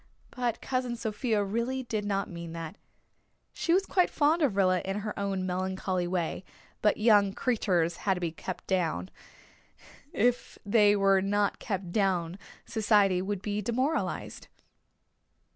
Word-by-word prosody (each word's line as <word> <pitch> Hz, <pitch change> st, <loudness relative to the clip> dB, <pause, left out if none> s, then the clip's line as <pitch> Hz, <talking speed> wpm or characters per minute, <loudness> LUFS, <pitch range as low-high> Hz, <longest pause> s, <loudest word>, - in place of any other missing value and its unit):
But 240 Hz, -3 st, -2 dB
Cousin 255 Hz, -2 st, -2 dB
Sophia 220 Hz, -1 st, -1 dB
really 235 Hz, +6 st, -2 dB
did 215 Hz, -4 st, -3 dB
not 200 Hz, -1 st, -1 dB
mean 170 Hz, -1 st, -7 dB
that. 165 Hz, +2 st, -6 dB, 0.8 s
She 335 Hz, -, -1 dB
was 380 Hz, +3 st, +3 dB
quite 365 Hz, -2 st, +2 dB
fond 310 Hz, +3 st, +2 dB
of 270 Hz, -10 st, +2 dB
Rilla 185 Hz, -2 st, +3 dB
in 195 Hz, +2 st, -3 dB
her 210 Hz, 0 st, -4 dB
own 195 Hz, -2 st, -1 dB
melancholy 185 Hz, 0 st, -2 dB
way; 175 Hz, 0 st, -2 dB, 0.4 s
but 210 Hz, -, +3 dB
young 210 Hz, -3 st, +4 dB
creeturs 185 Hz, -10 st, 0 dB
had 195 Hz, -2 st, 0 dB
to -, -, -5 dB
be 170 Hz, -2 st, -2 dB
kept 180 Hz, +3 st, -7 dB
down. 165 Hz, -, -1 dB, 1.0 s
If 245 Hz, +3 st, 0 dB
they 205 Hz, 0 st, +5 dB
were 195 Hz, -1 st, +4 dB
not 205 Hz, +1 st, 0 dB
kept 190 Hz, -5 st, -4 dB
down 185 Hz, -3 st, 0 dB, 0.3 s
society 205 Hz, -4 st, +3 dB
would 195 Hz, 0 st, -3 dB
be 210 Hz, 0 st, -2 dB
demoralized. 255 Hz, +9 st, -2 dB
200 Hz, 145 wpm, -29 LUFS, 185-230 Hz, 1.0 s, they